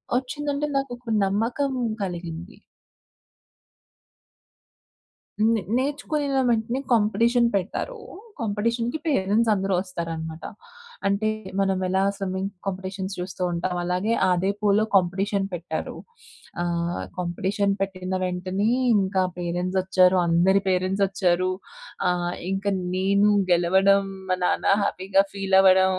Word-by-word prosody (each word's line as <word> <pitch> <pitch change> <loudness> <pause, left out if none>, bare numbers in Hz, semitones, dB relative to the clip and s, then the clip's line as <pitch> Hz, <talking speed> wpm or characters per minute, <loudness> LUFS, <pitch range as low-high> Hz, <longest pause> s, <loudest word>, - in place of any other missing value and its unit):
వచ్చిందంటే 285 +3 -2
నాకు 275 -2 -1
ఒక 240 -1 -7
నమ్మకం, 230 +8 0 0.3
కలిగింది. 175 +1 -5 2.8
హ్మ్. 225 +1 +3 0.2
నేర్చుకొనిన 285 +1 -1
వెంటనే 235 +2 0
కాంపిటీషన్ 230 +3 +3
పెట్టారు. 215 - -2 0.4
కాంపిటీషన్‌కి 230 +4 -1
పేరెంట్స్ 225 -4 +2
అందరూ 195 -1 -1
వస్తారనమాట. 165 -3 -5 0.6
అంటే, 200 +2 +1 0.3
మనం 195 -1 +2
ఎలా 190 +1 +1 0.2
స్విమ్మింగ్ 190 0 -3 0.2
కాంపిటీషన్స్ 190 0 -4
చూస్తూ 180 0 -4
ఉంటాం. 175 +1 -2
అలాగే 180 +5 0 0.2
అదే 180 +2 +1
పూల్‌లో 210 +1 +3
కాంపిటీషన్ 195 +2 +1
పెట్టారు. 170 -2 -4 0.7
ఆహ్, 170 0 -2 0.2
కాంపిటీషన్ 190 +3 0
పెట్టిన 185 -1 -2
వెంటనే, 185 +3 -1 0.3
ఇంకా 190 -1 +1 0.2
పేరెంట్స్ 180 +2 -2
వచ్చారు. 185 0 +4
అందరి 180 +4 +4
పేరెంట్స్ 185 +2 +1
వచ్చారు. 185 -2 +1 0.6
ఆహ్, 175 0 -1 0.2
ఇంకా 195 +1 -1 0.3
నేను 200 +2 +3 0.2
గెలవడం, 190 +3 +4 0.3
మా 185 - +2
నాన్న - - +1 0.2
హ్యాపీగా 195 0 +2
ఫీల్ 195 -1 0
అవ్వడం, 190 0 +5
195 Hz, 105 wpm, -24 LUFS, 180-215 Hz, 2.8 s, అవ్వడం